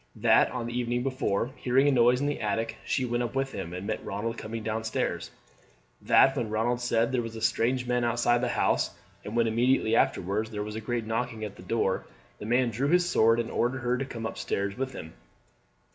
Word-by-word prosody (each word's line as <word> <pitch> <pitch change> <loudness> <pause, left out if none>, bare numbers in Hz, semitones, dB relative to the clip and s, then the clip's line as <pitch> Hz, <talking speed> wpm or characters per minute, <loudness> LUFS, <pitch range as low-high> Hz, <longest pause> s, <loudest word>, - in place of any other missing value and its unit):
That - - +4
on 125 -2 -4
the 120 0 -5
evening 120 0 -1
before, 130 -3 -1
hearing 130 +3 +2
a - - +5
noise 125 0 +4
in - - 0
the 145 0 -2
attic, 115 0 -1
she 130 - 0
went 120 0 -1
up 120 +1 -3
with 135 0 0
him, 95 -4 -5
and 90 +2 -6
met 110 +1 -3
Ronald 115 +4 -3
coming 115 0 -6
down 110 0 -2
stairs. 110 0 -2 0.7
That 135 - +5
when 120 -5 -2
Ronald 115 +3 0
said 115 -1 +1
there 125 -2 +1
were 115 - -5
strange 115 +3 0
men 125 0 0
outside 120 0 +2
the 125 - +1
house, - - +1 0.3
and 105 - -6
when 115 -1 +3
immediately 115 0 +2
afterwards 105 +1 +1
there 105 -2 -4
was 105 0 -6
a 110 - -4
great 120 0 -2
knocking 115 0 -2
at 105 - -8
the - - -13
door, 95 0 0 0.4
the 105 - -6
man 120 +1 +2
drew 125 +6 -1
his 175 +3 +3
sword 115 -6 +4
and 115 - -2
ordered 125 +2 0
her 120 0 +1
to 135 +2 -2
come 115 -4 -6
up 110 - -5
stairs 100 0 -2
with 130 0 -3
him. 80 - -9
115 Hz, 220 wpm, -28 LUFS, 110-125 Hz, 0.7 s, a